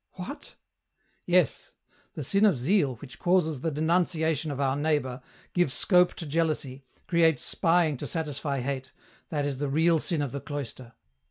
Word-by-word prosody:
"What?" 190 +11 -8 0.3
" - - -44
Yes: 180 -8 +1 0.4
the 150 - -4
sin 195 +10 +1
of 200 -9 +5
zeal 140 0 +2
which 125 +2 -12
causes 165 -6 +1
the 165 - 0
denunciation 160 0 +1
of 140 -2 -4
our 135 -1 +1
neighbour, 145 -4 -1 0.3
gives 175 -7 +1
scope 180 -2 +4
to 165 - -6
jealousy, 150 -4 -1 0.2
creates 165 -5 +3
spying 165 -4 +2
to - - -5
satisfy 145 -4 -3
hate, 130 0 -4 0.4
that 145 -3 -1
is 140 -2 -3
the 145 -1 -1
real 160 +3 +3
sin 155 -2 -1
of 140 - -3
the 140 - -5
cloister. 130 -4 -7
150 Hz, 165 wpm, -27 LUFS, 140-170 Hz, 0.4 s, of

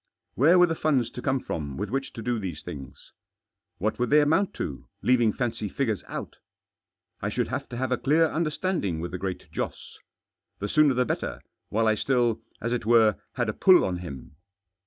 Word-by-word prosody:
Where 160 +8 +5
were 180 - +7
the 165 - -1
funds 135 -7 +1
to 125 - -7
come 135 0 +1
from 70 - -5
with 105 +3 -3
which 135 +1 -2
to 115 - -7
do 120 -1 0
these 90 -7 -5
things? 70 -7 -9 0.7
What 110 +5 -1
would 125 - +1
they 150 - +6
amount 165 +7 +2
to, 70 - -5 0.2
leaving 120 -3 +4
fancy 115 -3 -2
figures 110 -7 -1
out. - - -6 0.8
I - - -1
should - - -1
have - - -4
to 120 - -6
have 130 0 -2
a 125 - +2
clear 155 +5 +4
understanding 155 - -1
with 85 +2 -4
the 90 - -4
Great 95 -1 -5
Joss. - - -5 0.6
The 105 - -3
sooner 150 +1 +4
the 125 0 +2
better, - - -3 0.3
while 115 +2 +1
I 110 - +4
still, 120 0 +1 0.2
as 115 +1 -2
it 120 - -1
were, 110 -3 +5 0.2
had 120 -3 -1
a 110 - -1
pull 185 - +6
on 90 -1 -1
him. 75 -5 -9
120 Hz, 200 wpm, -26 LUFS, 100-140 Hz, 0.8 s, were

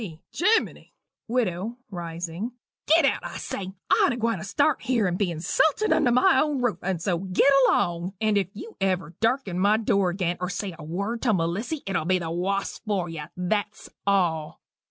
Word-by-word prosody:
C. 165 -7 -7
"Gimmeni!" 430 +6 +1 0.3
WIDOW 225 -2 -1
(rising). 175 +5 -5 0.3
"Git 320 0 +5
out, 275 - +1
I - - -6
say 190 -1 -5 0.2
I - - +5
ain't - - +2
a - - -4
gwine 230 -1 0
to - - -6
start' 285 +8 +1
here 245 -5 +1
and 180 -1 0
be 190 -1 0
insulted 305 - +1
under 300 -6 +3
my 255 +2 +5
own 295 -3 0
ruff 245 -3 0
and 185 -2 -1
so 175 0 0
git 185 +4 +1 0.2
along 175 +2 0
and 215 -1 +2
if 195 -3 +2 0.3
ever 190 -2 0
you 170 - -17
darken 225 -6 0
my 205 +3 +4
door 200 -4 +2
again, 175 -1 -1
or 180 0 -2
say 195 -1 -4
a - - -8
word 200 +9 -3
to 230 -5 +2
Melissy, 195 - -2
it'll 185 -5 -1
be 185 +2 +3
the 165 -2 -4
woss 195 +3 -2
for 200 -5 -2
you 160 -2 -6
that's 205 +3 -2 0.2
all." 170 -6 0
195 Hz, 195 wpm, -25 LUFS, 175-235 Hz, 0.3 s, Git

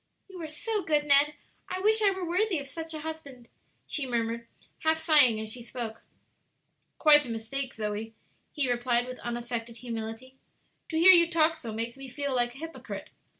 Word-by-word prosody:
"You 375 -3 -10
are 320 - -4
so 415 +7 -3
good, 300 -2 +1
Ned! 290 +1 +5 0.3
I 370 - -3
wish 435 +3 +4
I 410 - +5
were 380 -2 -3
worthy 370 +2 +1
of 280 - -5
such 325 +2 -5
a 310 - -5
husband," 285 -6 -8 0.4
she 280 -4 -3
murmured, 235 -1 -2 0.3
half 320 0 +2
sighing 295 -9 +5
as 220 0 -5
she 250 - -8
spoke. 230 -2 -6 1.0
"Quite 295 -2 +7
a 255 - -7
mistake, 245 +4 -3
Zoe," 215 +1 -4 0.4
he 290 -4 -1
replied, 240 0 +2
with 255 0 -8
unaffected 235 -1 -4
humility; 230 +2 -6 0.5
"to 320 - -2
hear 350 +3 +9
you 340 -2 +7
talk 325 -1 +3
so 240 -8 -7
makes 230 +3 -4
me 270 -1 -9
feel 280 +2 -3
like 240 -1 0
a - - -11
hypocrite. 325 +2 -8
270 Hz, 185 wpm, -28 LUFS, 235-320 Hz, 1.0 s, hear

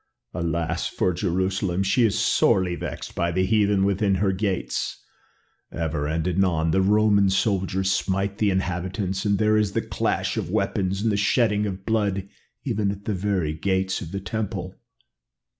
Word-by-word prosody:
Alas 85 -1 -1
for 90 - 0
Jerusalem! 95 +1 0
she 110 +6 +2
is 110 -4 +2
sorely 95 -2 +2
vexed - - -6
by 85 0 0
the 95 +2 +1
heathen 100 -2 +2
within 100 0 +1
her 95 +1 +1
gates. 95 0 -2 0.7
Ever 75 -3 -2
and 80 +2 -1
anon 85 -3 +1
the 95 - +3
Roman 100 0 +4
soldiers 95 -1 +1
smite 95 +2 -1
the 105 - +3
inhabitants 95 +1 -2
and 100 -1 +2
there 110 0 +3
is 105 -2 +1
the - - +1
clash - - -1
of - - -2
weapons 95 +1 -1
and 115 - +2
the 100 - 0
shedding 105 0 +2
of 95 -1 -6
blood 100 -4 0 0.4
even 110 -6 0
at 100 0 -6
the 110 - -1
very 95 -5 -1
gates 95 +3 -1
of 85 - -7
the 100 - -3
temple." 105 +2 -4
95 Hz, 160 wpm, -24 LUFS, 90-105 Hz, 0.7 s, Roman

